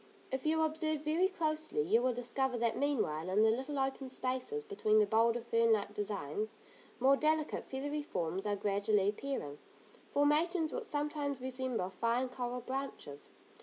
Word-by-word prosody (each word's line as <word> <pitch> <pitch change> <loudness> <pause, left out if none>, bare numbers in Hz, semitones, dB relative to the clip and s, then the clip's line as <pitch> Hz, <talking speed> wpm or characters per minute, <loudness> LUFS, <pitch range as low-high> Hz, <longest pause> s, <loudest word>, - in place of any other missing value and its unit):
If 265 +3 -2
you 320 +1 +3
observe 310 -1 0
very 320 +5 +3
closely, 315 - -1
you 215 +9 +3
will 255 +1 +2
discover 245 +1 -1
that 235 -1 +1
meanwhile, 185 - 0
in 205 +3 +4
the 220 - +5
little 265 +5 -2
open 270 0 -1
spaces, 260 - -3
between 310 - +1
the 215 - +6
bolder 230 +3 +3
fern 230 0 +2
like 205 -1 -1
designs, 205 0 -3 0.4
more 265 +2 +6
delicate 310 +1 0
feathery 290 +3 -3
forms 185 - -3
are 205 - +1
gradually 205 0 +2
appearing, 210 - -4 0.5
formations 315 +3 +2
which 485 - -3
sometimes 290 -3 -2
resemble 255 -7 -2
fine 235 +6 0
coral 250 0 -4
branches. 260 - -5
255 Hz, 155 wpm, -34 LUFS, 215-295 Hz, 0.5 s, the